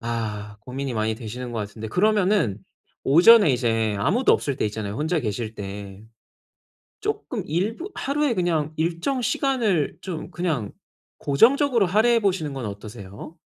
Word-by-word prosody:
아 105 -3 -4
고민이 135 +1 -5
많이 110 0 0
되시는 120 +2 -7
것 115 - -3
같은데 110 +1 -6
그러면은 195 - +2 0.5
오전에 180 +6 +7
이제 115 -4 +1
아무도 225 - +3
없을 140 -3 0
때 - - 0
있잖아요, 105 -1 -4
혼자 160 +5 0
계실 110 -1 -3
때. 100 0 -8 1.0
쪼끔 - - -3
일부 215 - -2
하루에 285 -1 0
그냥 165 -6 0
일정 170 - -1
시간을 230 - 0
좀 175 -5 -6
그냥 155 - -2 0.5
고정적으로 235 - +4
할애해 220 +6 +3
보시는 185 -8 -1
건 135 -3 -5
어떠세요? 105 - -9
145 Hz, 310 characters per minute, -24 LUFS, -, 1.0 s, 오전에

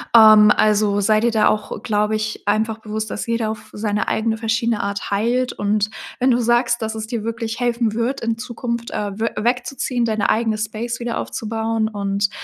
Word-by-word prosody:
Ähm, 215 -2 +9
also, 210 -1 +2
sei 215 +2 +3
dir 235 +2 +2
da 215 -2 +4
auch 210 0 -3
glaube 210 0 +1
ich 215 -1 -4
einfach 220 +1 +1
bewusst, 215 -1 -4
dass - - -4
jeder 230 -1 0
auf 220 - -9
seine 210 0 -1
eigene 220 0 0
verschiedene 225 0 0
Art 200 0 -4
heilt 240 +5 +1
und 205 +1 0 0.3
wenn 260 +1 +3
du 240 - +3
sagst, 240 0 +2
dass 220 0 -3
es 220 - -4
dir 225 -2 -4
wirklich 230 0 -3
helfen 235 -2 0
wird 235 +4 -1
in 230 -1 -1
Zukunft 235 -1 -4
äh, 205 0 -4
wö 225 - +1
wegzuziehen, 245 +2 -1
deine 215 -2 0
eigene 220 -1 +1
Space 220 +2 -4
wieder 235 -1 -2
aufzubauen 225 0 -2
und 200 -1 -1
220 Hz, 190 wpm, -20 LUFS, 215-235 Hz, 0.3 s, Ähm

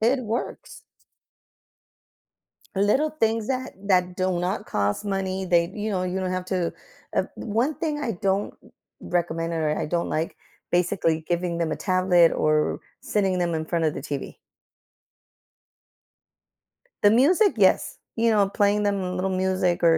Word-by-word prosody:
It 245 +4 +2
works, 225 +2 -4
st - - -14 1.9
Little 210 +10 +3
things 225 -7 0
that 260 -1 -2 0.2
that 180 -2 +2
do 185 -1 0
not 185 +4 -2
cost 100 - -1
money, 190 -1 -2
they 170 0 +2
you 215 0 -3
know, 185 -2 -1
you 185 +1 -2
don't 185 -1 -2
have 185 0 -2
to 180 -3 -1 0.4
uh, - - +3
1 235 +7 -1
thing 305 -3 -2
I 245 -5 -1
don't 195 +1 0 0.5
recommend 165 -1 -2
or 155 -2 0
I - - -1
don't 170 +2 -1
like 160 +2 -2 0.4
basically 175 -3 +1
giving 175 0 -1
them 170 -2 -1
a - - -2
tablet 185 -3 +4
or 155 0 +1 0.2
sitting 195 -3 0
them 175 -1 0
in 160 - -2
front 165 0 0
of 155 - +1
the - - -6
TV. 140 0 -5 2.7
The 205 - +6
music, 350 - +4
yes, 190 -3 +3 0.2
you 230 0 +2
know 205 -2 +4
playing 205 +1 +2
them 200 -1 +1
a 180 0 -3
little 185 +1 -1
music 185 -2 0
or 165 -1 +6
185 Hz, 155 wpm, -25 LUFS, 170-210 Hz, 2.7 s, The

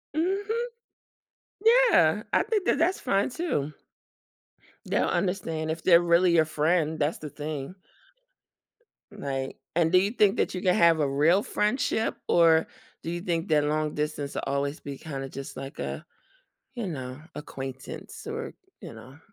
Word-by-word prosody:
Mhm. 405 +8 0 1.0
Yeah, - - +5
I - - +4
think 420 -5 -1
that - - +2
that's 345 +4 +1
fine 200 -3 +1
too. 200 - -2 1.1
They'll - - +1
understand 175 -3 -1
if 165 0 -4
they're 170 -1 +6
really 170 +1 +4
your 160 -2 +5
friend. 155 +1 0
That's 150 +2 0
the 150 - -7
thing. 150 +2 -6 1.4
Right, 135 -1 -4 0.2
and 165 -1 +3
do 185 - +6
you 200 +3 0
think 210 -3 +3
that - - 0
you 180 - -4
can 180 -1 +3
have 165 -2 +5
a 145 - +2
real 155 +8 +3
friendship, 220 +1 0
or 165 -2 +5 0.4
do 165 - -4
you 175 0 -3
think 170 -3 -1
that 150 -1 +4
long 150 0 0
distance 150 -1 -3
will - - -3
always 140 +2 -1
be 140 -1 -7
kind 135 -3 -6
of 135 - -7
just 135 0 -7
like 135 +1 -8
a, - - -4 0.7
you 235 -5 -4
know, 130 -4 -6
acquaintance 135 -2 -8
or, - - -5 0.3
you - - -9
know. 130 +6 -13
160 Hz, 160 wpm, -27 LUFS, 145-195 Hz, 1.4 s, they're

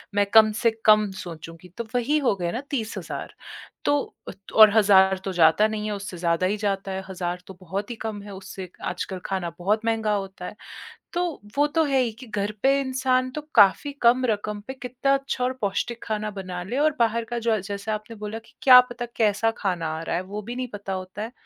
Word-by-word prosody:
मैं 205 0 +4
कम 220 -1 +8
से 230 +2 +1
कम 215 -1 +6
सोचूँगी, 165 -2 -9
तो 235 - -2
वही 250 +5 +2
हो 255 -8 +2
गए 175 -3 -2
ना 240 - -3
30 230 -6 -3
हज़ार। - - -6 0.5
तो 290 - +3 0.3
अ, - - -4 0.2
और 215 -1 +10
1000 190 -2 +5
तो 195 - -2
जाता 170 +4 +5
नहीं 215 -1 -4
है, 215 - -2
उससे 200 -2 -7
ज़्यादा 170 +1 +1
ही 205 +3 -1
जाता 195 -2 -2
है। 190 0 -4
1000 180 -1 -3
तो 190 - -9
बहुत 195 +5 -4
ही - - -4
कम 220 -2 -4
है 205 -1 -9
उससे, 190 -1 -8 0.2
आजकल 185 +1 -4
खाना 185 -3 -2
बहुत 210 +5 0
महँगा 220 -2 +1
होता 195 -2 -5
है। - - -7 0.6
तो 350 -2 -2 0.2
वो 290 +1 +4
तो 320 +2 +1
है 275 -2 +2
ही 240 -2 0
कि 255 - -10
घर 205 -1 -2
पे 275 +1 +4
इंसान 255 -1 +1
तो 300 - -3
काफ़ी 210 +7 +5
कम 245 +2 +4
रकम 210 -2 -1
पे 265 - -4
कितना 255 +1 -1
अच्छा 275 -2 -1
और 255 - +1
पौष्टिक 220 +4 -2
खाना 215 -1 -3
बना 185 -3 -6
ले 225 +8 -4
और 300 0 +2
बाहर 230 0 +2
का 240 +1 -3
जो 230 0 0
अ, 220 - +2
जैसे 200 +2 -5
आपने 215 +2 -5
बोला 210 +1 -5
कि 225 - -23
क्या 255 -2 +10
पता 240 0 -5
कैसा 220 0 +2
खाना 180 -5 -1
आ - - -6
रहा 165 - -2
है, 175 - 0
वो 205 +3 -6
भी 235 +4 -7
नहीं 255 0 -3
पता 200 -1 -5
होता 185 +2 -6
है। 225 +3 -5
215 Hz, 225 wpm, -24 LUFS, 190-240 Hz, 0.6 s, और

